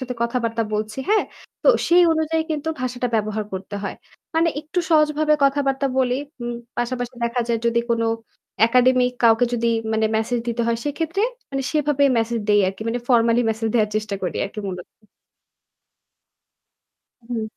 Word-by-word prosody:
সাথে 250 -1 -4
কথাবার্তা 235 -1 -1
বলছি। 215 +3 -3
হ্যাঁ? 430 0 +3 0.4
তো - - +4 0.2
সেই 350 +1 +6
অনুযায়ী 320 0 0
কিন্তু 310 0 -2
ভাষাটা 250 -1 -2
ব্যবহার 215 0 -1
করতে 190 +2 -6
হয়। 200 - -4 0.4
মানে 330 +1 +3
একটু 315 +4 -4
সহজভাবে 305 -1 +3
কথাবার্তা 275 0 +1
বলি। 255 -1 +2 0.3
উম 240 0 -3 0.2
পাশাপাশি 245 +1 -2
দেখা 240 +1 0
যায় 230 -1 +1
যদি 235 0 +2
কোনো 230 -1 +1 0.6
একাডেমিক 250 +1 +3
কাউকে 225 +1 +5
যদি 235 -1 0 0.3
মানে 220 0 +2
মেসেজ 225 +2 0
দিতে 235 0 -1
হয় 235 0 +1
সেক্ষেত্রে 325 +7 -1 0.3
মানে 270 -1 -2
সেভাবে 295 -2 +2
মেসেজ 225 0 -1
দেই 205 0 +5
আরকি। 195 +3 -6
মানে 235 +2 -1
ফর্মালি 235 -1 +4
মেসেজ 220 0 -2
দেওয়ার 215 -3 +2
চেষ্টা 210 -2 -2
করি 180 - -2
আরকি 210 +2 -7
মূলত। 180 -1 -6 2.4
হুম। 235 -2 -2
240 Hz, 155 wpm, -22 LUFS, 225-280 Hz, 2.4 s, সেই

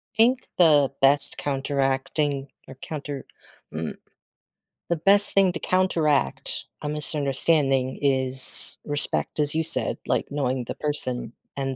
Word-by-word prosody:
Think 245 +3 +1
the 150 -6 +4
best 140 +1 +3
counteracting, 140 0 -2 0.2
or 135 - -12
counter 145 -3 -7 0.5
mm, 80 0 -5 0.9
the 170 - 0
best 200 +5 +4
thing 195 -2 +2
to 170 - -5
counteract 165 -7 -1 0.2
a 150 - -5
misunderstanding 140 -2 +1
is 130 -2 +3
respect, 145 +1 +3
as 150 0 +1
you 160 - 0
said- - - 0
like, - - -1
knowing 130 -3 -3
the - - -7
person 130 -6 -3 0.2
and 135 -1 -4
145 Hz, 125 wpm, -23 LUFS, 135-155 Hz, 0.9 s, the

